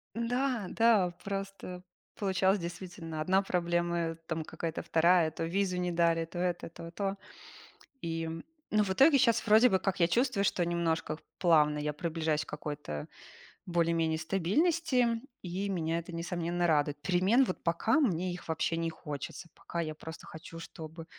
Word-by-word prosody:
Да, 240 Hz, -2 st, 0 dB
да 220 Hz, -6 st, +4 dB
просто 195 Hz, -2 st, -5 dB, 0.3 s
получалось, 190 Hz, -1 st, +2 dB
действительно, 170 Hz, -2 st, -6 dB
1 190 Hz, +4 st, +3 dB
проблема, 175 Hz, -2 st, 0 dB
там 160 Hz, -1 st, -2 dB
какая-то 165 Hz, +1 st, -4 dB
2. 165 Hz, 0 st, +4 dB
То 165 Hz, -, -4 dB
визу 185 Hz, +2 st, 0 dB
не 180 Hz, 0 st, -1 dB
дали, 170 Hz, -1 st, +2 dB
то 170 Hz, +2 st, -10 dB
это, 175 Hz, -1 st, -1 dB
то 165 Hz, 0 st, -9 dB
то. 195 Hz, +2 st, -2 dB, 0.8 s
И, 165 Hz, -2 st, -3 dB, 0.4 s
ну 215 Hz, 0 st, +4 dB
в 200 Hz, -, -2 dB
итоге, 275 Hz, +8 st, +6 dB
щас 235 Hz, -3 st, +3 dB
вроде 220 Hz, +3 st, +7 dB
бы, 190 Hz, -, +3 dB
как 190 Hz, -1 st, -2 dB
я 170 Hz, -, +5 dB
чувствую, 240 Hz, 0 st, +2 dB
что 180 Hz, -2 st, +2 dB
немножко 165 Hz, -2 st, -1 dB, 0.2 s
плавно 150 Hz, -4 st, +4 dB
я 150 Hz, 0 st, -1 dB
приближаюсь 155 Hz, -1 st, -1 dB
к -, -, -32 dB
какой-то 145 Hz, -, -5 dB, 0.6 s
более-менее 165 Hz, -2 st, +1 dB
стабильности, 235 Hz, -, +1 dB, 0.2 s
и 185 Hz, +3 st, -3 dB
меня 165 Hz, -3 st, 0 dB
это 170 Hz, -, -9 dB
несомненно 175 Hz, 0 st, -2 dB
радует. 150 Hz, -3 st, +2 dB
Перемен 190 Hz, -, +3 dB
вот 185 Hz, -, -5 dB
пока 170 Hz, -, +2 dB
мне 185 Hz, -, +1 dB
их 180 Hz, -, -9 dB
вообще 160 Hz, +1 st, 0 dB
не 165 Hz, 0 st, -1 dB
хочется, 160 Hz, +1 st, -7 dB
пока 170 Hz, -, -6 dB
я 155 Hz, -2 st, -2 dB
просто 160 Hz, +2 st, -9 dB
хочу, 165 Hz, +1 st, -10 dB
чтобы 160 Hz, 0 st, -9 dB
175 Hz, 155 wpm, -31 LUFS, 165-195 Hz, 0.8 s, вроде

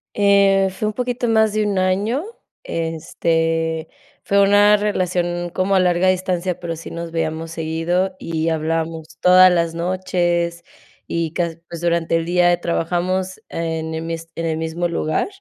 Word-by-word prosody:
Eh, 200 Hz, -1 st, +4 dB
fue 200 Hz, +3 st, -3 dB
un 215 Hz, -, -2 dB
poquito 245 Hz, +1 st, -2 dB
más 220 Hz, -2 st, +3 dB
de 215 Hz, 0 st, +1 dB
un 200 Hz, -2 st, -1 dB
año. 200 Hz, -, +1 dB, 0.4 s
Este, 165 Hz, 0 st, -1 dB, 0.4 s
fue 200 Hz, 0 st, +3 dB
una 205 Hz, +1 st, +6 dB
relación 175 Hz, -4 st, -1 dB
como 185 Hz, +2 st, 0 dB
a -, -, +5 dB
larga 180 Hz, 0 st, +2 dB
distancia, 185 Hz, -1 st, -1 dB
pero 170 Hz, -1 st, -4 dB
sí 165 Hz, -, -9 dB
nos 170 Hz, 0 st, -6 dB
veíamos 160 Hz, 0 st, -3 dB
seguido, 165 Hz, +4 st, -1 dB
y 165 Hz, 0 st, -2 dB
hablábamos 160 Hz, 0 st, -3 dB
todas 185 Hz, 0 st, +7 dB
las 170 Hz, -2 st, +1 dB
noches 175 Hz, -1 st, -1 dB, 0.4 s
y 165 Hz, -2 st, -2 dB
casi 170 Hz, -2 st, -2 dB
pues, 170 Hz, -1 st, -7 dB
durante 170 Hz, -1 st, +1 dB
el 165 Hz, -, -2 dB
día, 175 Hz, 0 st, +3 dB
eh, 175 Hz, -, +2 dB
trabajamos 180 Hz, +2 st, -2 dB
en 160 Hz, -1 st, -3 dB
el 160 Hz, -, -4 dB
mis 165 Hz, 0 st, -5 dB
en 165 Hz, -, -3 dB
el 160 Hz, -1 st, -1 dB
mismo 160 Hz, +2 st, -2 dB
lugar, 155 Hz, -, -1 dB
175 Hz, 160 wpm, -20 LUFS, 165-185 Hz, 0.4 s, todas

